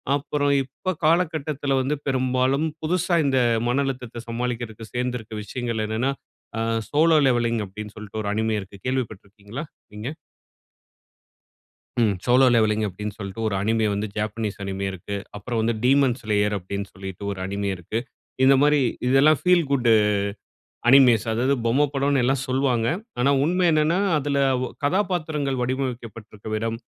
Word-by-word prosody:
அப்பறம் 145 0 0
இப்ப 140 +8 -4
காலகட்டத்தில 155 -4 +1
வந்து 140 +3 0
பெரும்பாலும் 130 +2 +1 0.2
புதுசா 180 +2 +1
இந்த 135 -2 +2 0.3
மன 135 +3 +2
அழுத்தத்தை 125 -3 -5
சமாளிக்கறதுக்கு 115 -2 -4
சேந்திருக்கிற 125 -3 -3
விஷயங்கள் 115 0 -3
என்னன்னா, 115 +5 0 0.5
ஆ - - -1 0.3
"Solo 160 +2 +4
Leveling" 120 -2 +1
அப்டீன்னு 105 +2 -9
சொல்லிட்டு 105 0 -6
ஒரு 100 - -2
அனிமே 110 0 0
இருக்கு. 95 0 -13
கேள்விப்பட்டு 125 -6 -2
இருக்கீங்களா 105 +8 -8 0.3
நீங்க? 105 +5 -5 1.9
ம். 105 -3 +3
"சோலோ 125 +2 +5
லெவெல்லிங்" 110 -1 +2
அப்படீன்னு 105 +2 -6
சொல்லிட்டு 100 +1 -6
ஒரு 100 - -2
அனிமே 110 +1 +1
வந்து 105 +2 -2
ஜாப்பனீஸ் 105 0 -3
அனிமே 95 0 -3
இருக்கு. 95 +2 -6 0.2
அப்புறம் 115 +2 -3
வந்து 115 +1 +1
"டீமோன் 135 -1 +4
ஸ்லேயர்" 105 -1 +1
அப்படீன்னு 100 +2 -5
சொல்லிட்டு 95 0 -8
ஒரு 100 - -5
அனிமே 100 +1 -2
இருக்கு. 90 +6 -4 0.5
இந்த 135 - +7
மாரி 150 0 +4 0.3
இதெல்லாம் 140 +3 +5
ஃபீல் 180 -3 +4
குட் 125 -3 +2 1.0
அனிமேஸ் 125 -4 +6
அதாவது 125 +5 +1
பொம்மை 135 +6 +3
படம்ன்னு 140 -1 +2
எல்லாம் 135 +1 +1
சொல்லுவாங்க. 130 -3 +1 0.3
ஆனா 135 - +3
உண்மை 180 +4 +2
என்னன்னா 155 +3 +2 0.2
அதில 145 -1 -1 0.3
ஒ - - -4 0.2
கதாபாத்திரங்கள் 155 -6 0
வடிவமைக்கப்பட்டிருக்கிற 115 -5 -4
விதம், 115 +1 -2
125 Hz, 140 wpm, -24 LUFS, 110-140 Hz, 1.9 s, இந்த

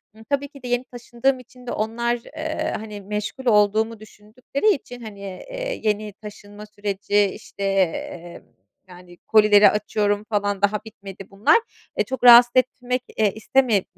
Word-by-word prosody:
Hı, 220 - -15
tabii 285 0 0
ki 275 -2 -16
de - - -6
yeni 245 0 0
taşındığım 245 +2 -2
için 250 0 -17
de - - -3
onlar, 235 +3 -1 0.2
eee, 315 0 -3
hani 210 -1 -8
meşgul 210 +6 -5
olduğumu 215 0 +2
düşündükleri 220 - -2
için, 245 -2 -11
hani, 215 -3 -10
eee, - - -6
yeni 210 -1 -1
taşınma 205 0 -12
süreci, 205 0 -1
işte, 200 0 -7
eee, 175 -3 -2 0.5
yani, 180 -1 -14
kolileri 210 0 +5
açıyorum 210 0 -1
falan, 205 -2 -1
daha 205 +1 +2
bitmedi 195 -3 -11
bunlar, 200 - +4 0.4
eee, - - +3
çok 260 -2 -6
rahatsız 240 0 +9
etmek, 250 0 0 0.2
eee, 215 -2 +3
isteme 220 -2 +1
215 Hz, 150 wpm, -22 LUFS, 205-245 Hz, 0.5 s, rahatsız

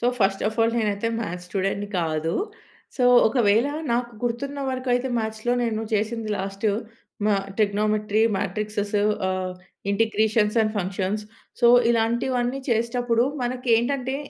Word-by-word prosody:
So, 240 - +1
first 195 -1 +1
of 220 - -7
all 225 0 +3
నేనైతే 210 0 0
maths 180 -4 -5
స్టూడెంట్‌ని 195 +2 -2
కాదు. 160 0 -1 0.6
సో, 250 - +2 0.2
ఒకవేళ 225 0 +3 0.3
నాకు 240 0 0
గుర్తున్న 275 +4 -2
వరకు 255 0 -4
అయితే, 250 +2 0
మ్యాథ్స్‌లో 220 +2 -2
నేను 225 -2 -1
చేసింది 220 +1 -1
లాస్టు 195 +2 -1 0.6
మా 210 - +4 0.2
ట్రిగ్నోమెంట్రీ, 210 0 +1 0.2
మాట్రిక్సేస్ 210 0 -3 0.3
ఆహ్, 185 -1 -2 0.4
ఇంటిగ్రేషన్స్ 220 0 +2
అండ్ 215 -1 +1
ఫంక్షన్స్. 195 +2 -2 0.4
సో, 240 - +5 0.2
ఇలాంటివన్నీ 240 +2 0
చేసేటప్పుడు 235 +1 +1 0.2
మనకి 250 +1 -3
ఏంటంటే, 260 +2 -1
220 Hz, 125 wpm, -24 LUFS, 205-240 Hz, 0.6 s, సో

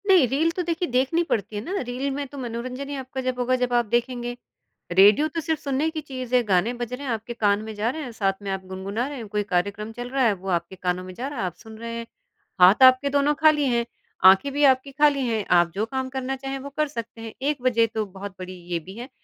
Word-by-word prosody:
नहीं, 365 -9 +6
रील 300 +6 +1
तो 365 - -1
देखिए 345 +1 -1
देखनी 265 +7 +2
पड़ती 220 -9 -2
है 205 - -2
ना 385 +9 -3
रील 255 +3 -2
में 280 +1 -3
तो 280 - -11
मनोरंजन 255 +2 -5
ही 285 - -4
आपका 265 0 -5
जब 255 -1 -2
होगा 250 +1 +2
जब 250 -1 -1
आप 240 -1 +3
देखेंगे। 240 +2 -1 0.6
रेडियो 205 - +6
तो 330 +1 -4
सिर्फ़ 320 -1 -2
सुनने 280 +3 0
की 320 -1 -5
चीज़ 255 -4 -7
है 250 - +5
गाने 200 +2 +2
बज 240 0 -5
रहे 275 +3 -5
हैं 260 - -2
आपके 225 +2 -4
कान 205 -3 +1
में 220 0 -6
जा 210 +3 0
रहे 315 +5 -4
हैं 250 - -6
साथ 195 -4 0
में 200 - -4
आप 190 0 -3
गुनगुना 195 +6 -3
रहे 285 -1 -6
हैं, 230 -3 -7
कोई 210 0 -1
कार्यक्रम 200 +4 -1
चल 245 +1 -6
रहा 265 0 +1
है 220 - +4
वो 190 0 -7
आपके 175 +1 -1
कानों 180 0 -2
में 185 0 -9
जा 250 +8 -5
रहा 285 -3 -6
है, 195 - 0
आप 180 - -4
सुन 220 -1 -13
रहे 230 +1 -6
हैं। 230 0 -6 0.5
हाथ 190 +8 +7
आपके 255 +2 +7
दोनों 285 +1 +2
खाली 310 -2 +5
हैं, 235 -1 +1 0.4
आँखें 195 +9 +7
भी 290 +1 +1
आपकी 260 +2 -10
खाली 280 -1 +3
हैं 220 -3 -1
आप 170 0 +1
जो 210 +3 0
काम 260 +2 -3
करना 265 0 -3
चाहें 270 0 -5
वो 280 +1 -7
कर 305 0 +2
सकते 230 -4 -7
हैं, 225 -1 -7
एक 285 -1 -1
वजह 235 -2 +3
तो 220 -1 0
बहुत 195 +1 -8
बड़ी 185 0 -7 0.2
ये 170 - 0
भी 185 +4 -11
है। 245 +3 -7
245 Hz, 265 wpm, -24 LUFS, 210-275 Hz, 0.6 s, हाथ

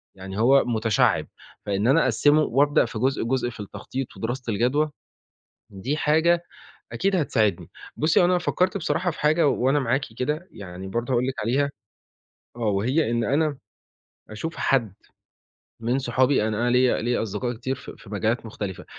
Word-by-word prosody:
يعني 95 +1 -7
هو 135 +4 +5
متشعِّب، 110 -3 +1 0.4
فإن 100 +1 0
أنا 150 +5 +5
أقسِّمه 150 +1 +3
وأبدأ 145 0 +3
في 115 -2 -6
جزء، 130 +3 +1
جزء 120 +1 0
في 120 - -12
التخطيط 105 +6 -6
ودراسة 120 +3 -3
الجدوى، 140 +8 +1 0.8
دي 110 +10 -3
حاجة 160 +3 +3 0.5
أكيد 195 +1 +1
هتساعدني، 110 - 0 0.3
بُصّي، 155 +2 +3
هو - - +5
أنا 180 0 +3
فكّرت 185 +2 0
بصراحة 180 0 0
في - - -9
حاجة 155 +2 +3
وأنا 135 +2 +2
معاكِ 135 +1 0
كده، 150 +7 -2
يعني 95 -1 -9
برضه 120 +6 -3
هأقول 125 0 +2
لِك 130 - -2
عليها 135 +6 +1 0.9
آه - - -11
وهي 115 +7 +1
إن 120 0 0
أنا 145 +4 +1 0.7
أشوف 160 +10 -5
حد 115 -8 +1 0.9
من 120 +3 0
صحابي 130 -2 +2
أنا 105 -1 -2
أنا 120 - +2
ليّا 125 -1 +3
ليّا 120 +1 0
أصدقاء 115 +3 -3
كتير 130 +3 -3
في 125 - -10
في 100 - -15
مجالات 110 +3 -1
مختلفة، 100 -4 -6
125 Hz, 160 wpm, -24 LUFS, 110-145 Hz, 0.9 s, هو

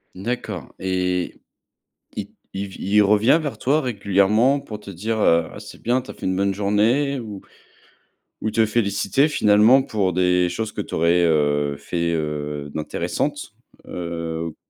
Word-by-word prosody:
D'accord 105 - -5
et 90 -1 -1 0.8
i - - -5 0.2
il 100 +1 -3
v 95 - -12
il 105 +2 +3
revient 105 +8 +4
vers 145 -3 -4
toi 150 +4 +1
régulièrement 110 +3 +2
pour 105 -5 -8
te 100 - -10
dire, 110 +5 -3
heu: 85 -4 +3
«Ah, - - -10
c'est - - -12
bien, 125 +3 +1
tu 130 - -11
as - - -8
fait - - -11
une 95 0 0
bonne 100 0 +1
journée» 115 +8 +1
ou 105 -4 -8 1.0
ou 110 - 0
te 110 0 +2
féliciter 105 +4 +1
finalement 110 0 +5
pour 100 -7 -1
des 90 0 +2
choses 110 +4 -3
que - - -5
tu - - -8
aurais, 85 +2 +3
heu, 75 -3 +1
fait, 85 +4 -2
heu, 75 -2 -3
d'intéressantes? 80 -1 -3 0.3
Heu 85 -2 -4
100 Hz, 160 wpm, -22 LUFS, 85-110 Hz, 1.0 s, finalement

